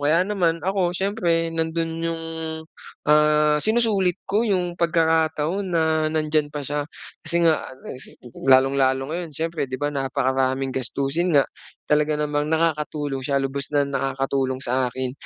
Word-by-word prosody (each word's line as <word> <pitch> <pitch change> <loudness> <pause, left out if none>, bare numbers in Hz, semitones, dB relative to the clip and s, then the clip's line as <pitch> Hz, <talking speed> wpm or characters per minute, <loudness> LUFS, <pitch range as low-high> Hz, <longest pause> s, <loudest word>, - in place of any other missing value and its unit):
Kaya 155 +4 +3
naman 175 -5 0
ako, 190 -2 +1
siyempre, 175 -5 0
nando'n 165 0 -1
'yung, 165 -1 -2 0.9
ah, 150 0 +4
sinusulit 215 -5 +2
ko 215 +4 +2
'yung 180 -3 -1
pagkakataon 165 +2 +1
na 165 -2 +1 0.3
nandiyan 155 -1 +1
pa 145 -1 -4
siya. 145 +1 -2 0.4
Kasi 170 +2 +1
nga 160 -2 +2 0.2
res 125 - -9 0.3
lalong-lalo 135 +1 +4
ngayon, 170 -2 -4
siyempre, 165 -2 -2
'di 130 - -3
ba, 145 - +1
napakaraming 135 -1 0
gastusin 140 +6 0
nga. 140 - +6 0.4
Talaga 150 0 +2
namang 150 0 -1
nakakatulong 150 -3 -1
siya. 140 +1 -1
Lubos 135 0 -3
na 145 -1 +4
nakakatulong 135 -1 -1
sa 125 +1 +1
akin 130 0 -4
150 Hz, 140 wpm, -23 LUFS, 135-165 Hz, 0.9 s, nga